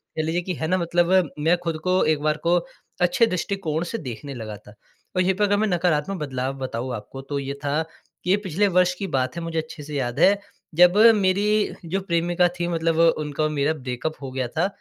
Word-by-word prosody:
कह 155 - -1
लीजिए 165 +3 0
कि 180 +1 -3
है 160 - -3
ना 185 +3 +2
मतलब, 175 0 +2
मैं 165 +4 +3
खुद 165 -2 -2
को 185 0 +2
एक 155 -1 +1
बार 150 0 +1
को 175 +1 +5 0.4
अच्छे 230 +7 +4
दृष्टिकोण 180 -4 -2
से 175 +6 -4
देखने 140 - -7
लगा 110 -4 -7
था। 105 - -16 0.4
और 185 - +3
यहीं 185 +1 +2
पे 210 - 0
अगर 205 0 +3
मैं 215 +1 +1
नकारात्मक 180 -1 0
बदलाव 130 -2 -3
बताऊँ 130 -1 -4
आपको, 115 +5 -8
तो 140 +1 -4
ये 140 0 -4
था 145 +2 +1 0.4
कि 180 - -4
ये 195 - +5
पिछले 190 +5 +2
वर्ष 180 0 +4
की 195 - -2
बात 130 +3 -1
है 170 - -4
मुझे 165 0 -4
अच्छे 155 -1 -7
से 150 0 -7
याद 120 -3 -2
है। 200 +1 +6 0.4
जब 180 +3 +6 0.2
मेरी 205 +2 +1
जो 180 +4 -1
प्रेमिका 175 -1 +2
थी 175 - 0
मतलब 165 -1 0
वो 165 +1 +5 0.2
उनका 150 +1 -2
और 155 - +2
मेरा 150 +1 +1
ब्रेकअप 130 +1 -4
हो 135 -2 -6
गया 130 -1 -2
था। 160 +9 0
165 Hz, 225 wpm, -23 LUFS, 140-180 Hz, 0.4 s, है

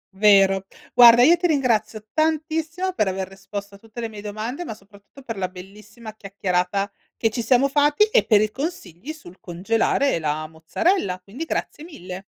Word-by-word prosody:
Vero. 195 -1 +4 0.3
Guarda 240 0 +8
io 330 +6 +7
ti 355 - +1
ringrazio 225 - 0
tantissimo 320 +3 -1
per 215 - 0
aver 190 0 -3
risposto 200 +1 -8
a - - -13
tutte 225 +2 -12
le 230 -1 -3
mie 210 -1 -10
domande, 215 +9 -5
ma 225 -10 -7
soprattutto 200 +6 -18
per 230 -5 -6
la 185 - -1
bellissima 210 +4 -12
chiacchierata 195 0 -2 0.3
che 225 -1 +1
ci 235 - -3
siamo 255 +3 +3
fatti 295 +6 +3
e - - +4
per 210 -3 +4
i 215 0 0
consigli 265 - -6
sul 190 - -13
congelare 225 +7 0
la 155 0 -2
mozzarella, 180 - -1
quindi 215 - -8
grazie 305 - -4
mille. 190 - -9
215 Hz, 170 wpm, -22 LUFS, 195-275 Hz, 0.3 s, Guarda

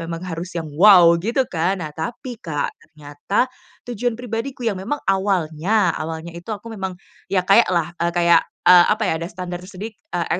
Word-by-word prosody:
memang 165 +1 -6
harus 175 0 -5
yang, 165 - -3
"wow" 180 -1 +7
gitu 235 +8 0
kan. 180 +3 -1
Nah 150 - -7
tapi 240 - -6
Kak, 150 -4 -3
ternyata 150 +8 -2 0.4
tujuan 240 0 -2
pribadiku 245 +2 -5
yang 200 -4 -1
memang 245 +10 -2
awalnya, 190 0 +1
awalnya 160 +1 -5
itu 170 +3 -11
aku 220 +2 -6
memang 190 -4 -5 0.3
ya 185 -2 +1
kayak 205 +2 +5
lah, 170 -2 0
eee, 170 0 +1
kayak, 170 -1 +5 0.2
eee, 175 -1 +8
apa 220 +1 -2
ya, - - +1
ada 170 - -4
standar 175 0 -6
sedik 205 +4 -8 0.2
eee, 175 -1 -1
180 Hz, 180 wpm, -21 LUFS, 170-215 Hz, 0.4 s, eee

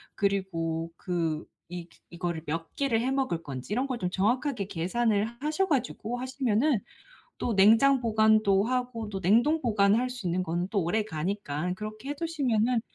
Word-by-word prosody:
그리고 170 -5 -1
그 165 -4 -2 0.2
이 175 -1 -7 0.2
이거를 170 -2 -3
몇 165 +1 -4
개를 255 -5 +1
해 250 - 0
먹을 265 -11 0
건지 135 +4 -6
이런 255 +5 0
걸 255 -2 -2
좀 180 -5 -2
정확하게 235 +4 0
계산을 205 +4 +1 0.2
하셔 310 +6 0
가지고 245 - -1
하시면은 260 0 +1 0.6
또 235 - -1
냉장 225 +7 +6
보관도 215 -3 +4
하고 245 -3 -2
또 195 -2 -4
냉동 235 - +3
보관할 220 +2 +3
수 245 -7 -5
있는 180 +2 0
거는 175 +1 -2
또 200 -4 0
오래 205 +7 +1
가니까 180 -3 -3
그렇게 215 +6 -7
해 - - 0
두시면은 255 -7 0
215 Hz, 320 characters per minute, -28 LUFS, 180-250 Hz, 0.6 s, 냉장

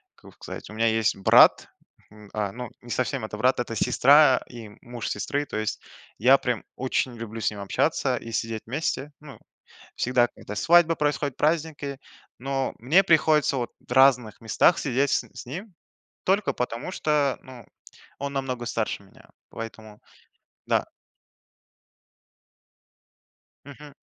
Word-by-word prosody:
как - - -17
бы - - -23
сказать. - - -9
У - - -10
меня 115 +1 +1
есть 110 0 +1
брат, 95 - +5 0.4
м, 105 -1 -15
а, 105 -2 -2
ну, 125 -1 -7
не 120 - -14
совсем 125 -3 -1
это 105 -1 -7
брат, 125 +3 +2
это 115 -1 -3
сестра 140 +3 +5
и 115 -3 -10
муж 120 -1 -6
сестры. 145 +7 -2
То 110 - -6
есть 110 -1 -3 0.4
я 130 +5 +6
прям 125 -4 -2
очень 130 0 -1
люблю 115 0 -7
с - - +1
ним 105 - -9
общаться 100 - 0
и 115 - -8
сидеть 115 -1 -2
вместе. 145 +2 -3
Ну, 145 -3 -12 0.6
всегда, 125 -1 +2
когда 105 -2 -10
свадьбы 165 +6 +4
происходят, 145 -2 -1
праздники, 150 -3 -1 0.4
но 135 0 -2
мне 160 - +4
приходится 155 -4 +3
вот 120 -1 -3 0.2
в - - -7
разных 125 -5 +4
местах 115 +9 +3
сидеть 135 0 0
с - - +2
н - - -19
с 135 - -9
ним 185 - -7 0.5
только 195 +1 +1
потому 125 +5 -4
что, 150 -5 0
ну, 130 -3 -12 0.5
он 140 0 -4
намного 130 -3 -3
старше 110 -3 -3
меня. 95 - -20 0.2
Поэтому 110 -2 -9 0.7
да. - - +1 2.8
Мгм. 145 +1 -13
125 Hz, 150 wpm, -25 LUFS, 115-145 Hz, 2.8 s, я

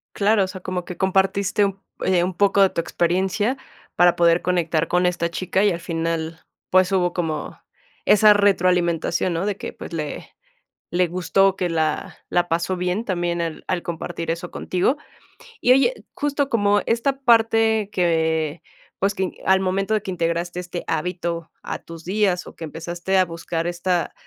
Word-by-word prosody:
Claro, 205 0 +3
o - - -4
sea, 185 0 -8
como 180 -1 -4
que 180 - -8
compartiste 190 +2 +2
un 195 -1 -3 0.2
eh, 180 -2 +3
un 180 +1 -1
poco 200 +2 +3
de 190 - +5
tu - - -2
experiencia 190 +8 0 0.4
para 175 0 +5
poder 170 0 +4
conectar 165 -3 +1
con 180 +1 +2
esta 170 -1 0
chica, 185 +3 0
y 205 - +4
al 170 - -5
final, 165 -1 -3 0.3
pues, 185 +1 +4
hubo 180 -2 +2
como 160 -4 -3 0.5
esa 210 0 +7
retroalimentación, 180 -3 +2
¿no? 165 +3 -1
De 205 -2 -1
que, - - -6
pues, - - -10
le 155 -3 -5 0.7
le 180 0 +3
gustó, 185 +2 +2
que 180 -2 -1
la 160 -2 -1
la 175 0 +1
pasó 170 +3 0
bien 180 +5 -2
también 175 -3 -1
al 165 -2 -4
al 180 - -1
compartir 165 0 -5
eso 170 +1 -3
contigo. 185 +11 0 0.6
Y 250 - +5
oye, 275 - +1
justo 285 -1 -1
como 205 -3 +2
esta 265 +4 0
parte 225 -3 +3
que, 160 -3 0 0.4
pues, 200 +1 +1
que 190 -2 -2
al 190 0 +5
momento 195 +2 0
de 215 - +1
que 190 -2 -5
integraste 170 0 -2
este 175 0 -6
hábito 170 0 -3
a - - -4
tus 165 -1 -11
días, 190 -1 0
o - - -11
que - - -9
empezaste 170 +4 -2
a 185 - +5
buscar 165 0 -4
esta 175 0 -1
180 Hz, 175 wpm, -22 LUFS, 170-195 Hz, 0.7 s, esa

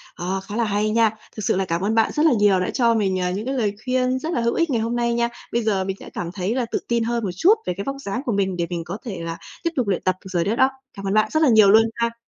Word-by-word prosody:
Ờ, 185 +2 -2
khá 205 - -7
là 235 - +1
hay 210 0 0
nha! 225 0 +4 0.3
Thực 215 - -5
sự 220 - +2
là 190 - 0
cảm 170 0 -2
ơn 215 +3 0
bạn 225 - +3
rất 300 - +2
là 315 - +6
nhiều 205 -4 +4
đã 180 - -1
cho 235 -3 +2
mình, 190 -3 +1
ờ, 180 - 0
những 205 +5 -4
cái 265 - -2
lời 210 -5 0
khuyên 255 0 +1
rất 325 +5 -3
là - - 0
hữu 235 0 +1
ích 335 -2 +1
ngày 235 -4 +1
hôm 230 +2 -1
nay 235 0 +1
nha. 235 0 +1 0.2
Bây 235 0 +1
giờ 200 -3 +1
mình 190 0 -3
sẽ - - -10
cảm 170 0 -5
thấy 195 +5 -2
là 255 - 0
tự - - 0
tin 235 -1 +1
hơn 235 0 -1
một 190 - -1
chút 365 - +5
về 180 - -1
cái 200 - -3
vóc 275 0 -3
dáng 245 +1 -4
của 240 - 0
mình 190 -3 0
để 170 - -1
mình 170 -2 -3
có 185 +5 -5
thể 195 -7 -5
là 165 0 -4 0.3
tiếp 335 - +1
tục 250 -6 0
luyện 190 - 0
tập 185 -1 +1
được - - -7
rồi 170 -2 +1
đó 215 +3 0
đó. 260 +1 +4 0.2
Cảm 195 0 -6
ơn 195 - 0
bạn 215 0 +3
rất 315 0 +2
là 280 - +5
nhiều 215 -3 +6
luôn 220 +2 +7
ha! 235 0 -1
215 Hz, 335 wpm, -22 LUFS, 190-235 Hz, 0.3 s, luôn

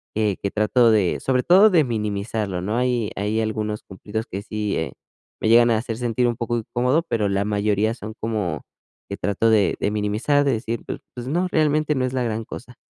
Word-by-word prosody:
que 105 -3 +1
que 100 - -2
trato 115 +2 +3
de, 100 -5 +2
sobre 130 -1 +1
todo, 195 +5 +7
de 170 -6 +4
minimizarlo, 105 -4 -2
¿no? 105 +4 -2
Hay 125 -3 0
hay 105 +2 -1
algunos 110 -1 -3
cumplidos 105 +3 -6
que 95 - -5
sí, 105 -1 -3
eh, 80 - -2 0.5
me - - +1
llegan 120 +1 +6
a 110 - +3
hacer 115 0 -3
sentir 120 0 0
un 120 - 0
poco 120 0 -1
incómodo, 125 +7 0
pero 105 -7 0
la 100 +1 0
mayoría 105 +1 +1
son 110 -2 -8
como 105 -8 -2 0.5
que 100 - -3
trato 105 +3 +1
de 105 -3 +3
de 100 - 0
minimizar, 105 +8 +1
de 140 - +3
decir, 115 +1 -3
pues - - -5 0.2
pues 120 - -6
no, 175 +6 0
realmente 155 -1 +2
no 130 - 0
es 130 - -2
la 130 -1 0
gran 115 -1 -2
cosa. 125 +2 -10
110 Hz, 210 wpm, -22 LUFS, 105-125 Hz, 0.5 s, todo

